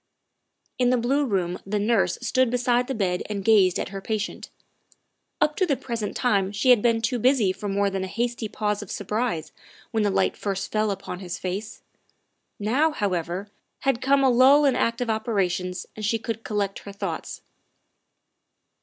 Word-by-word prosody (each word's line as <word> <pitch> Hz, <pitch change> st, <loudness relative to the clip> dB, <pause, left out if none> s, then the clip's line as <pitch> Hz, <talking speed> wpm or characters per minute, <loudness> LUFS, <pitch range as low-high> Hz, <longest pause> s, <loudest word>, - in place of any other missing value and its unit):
In 250 Hz, -1 st, +4 dB
the 250 Hz, -, +3 dB
blue 270 Hz, +4 st, +1 dB
room 180 Hz, -5 st, -1 dB
the 205 Hz, +2 st, -2 dB
nurse 210 Hz, 0 st, +2 dB
stood 255 Hz, +1 st, +2 dB
beside 245 Hz, 0 st, +1 dB
the 270 Hz, -, -2 dB
bed 180 Hz, -4 st, 0 dB
and 200 Hz, -2 st, -4 dB
gazed 200 Hz, -5 st, +5 dB
at -, -, -3 dB
her 195 Hz, 0 st, -6 dB
patient. 210 Hz, 0 st, -4 dB, 0.9 s
Up 300 Hz, 0 st, +2 dB
to 375 Hz, -, +3 dB
the 280 Hz, -4 st, +1 dB
present 230 Hz, -4 st, -4 dB
time 200 Hz, -5 st, +1 dB
she 230 Hz, +5 st, +3 dB
had 240 Hz, -4 st, +6 dB
been 230 Hz, -1 st, +2 dB
too 240 Hz, +1 st, 0 dB
busy 245 Hz, -5 st, +3 dB
for 205 Hz, +1 st, -5 dB
more 200 Hz, +1 st, +1 dB
than 195 Hz, -1 st, -2 dB
a -, -, -3 dB
hasty 235 Hz, +2 st, -2 dB
pause 210 Hz, 0 st, -2 dB
of 205 Hz, -, -9 dB
surprise 205 Hz, -6 st, -2 dB, 0.4 s
when 225 Hz, -, +1 dB
the 205 Hz, -, +2 dB
light -, -, +1 dB
first 195 Hz, -2 st, -3 dB
fell 215 Hz, 0 st, +1 dB
upon 195 Hz, -2 st, -5 dB
his 180 Hz, -2 st, -5 dB
face; 195 Hz, +4 st, -5 dB, 0.7 s
now, 255 Hz, +10 st, +2 dB
however, 190 Hz, -, -2 dB, 0.3 s
had 270 Hz, -3 st, +1 dB
come 275 Hz, +1 st, +3 dB
a 265 Hz, -, +5 dB
lull 270 Hz, +4 st, +6 dB
in 270 Hz, -, +3 dB
active 235 Hz, +1 st, 0 dB
operations 185 Hz, -5 st, -1 dB
and 215 Hz, -, -7 dB
she 215 Hz, +2 st, +1 dB
could 225 Hz, 0 st, -5 dB
collect 205 Hz, -2 st, -2 dB
her 200 Hz, -, -9 dB
thoughts. 200 Hz, -, -5 dB
215 Hz, 180 wpm, -25 LUFS, 195-245 Hz, 0.9 s, had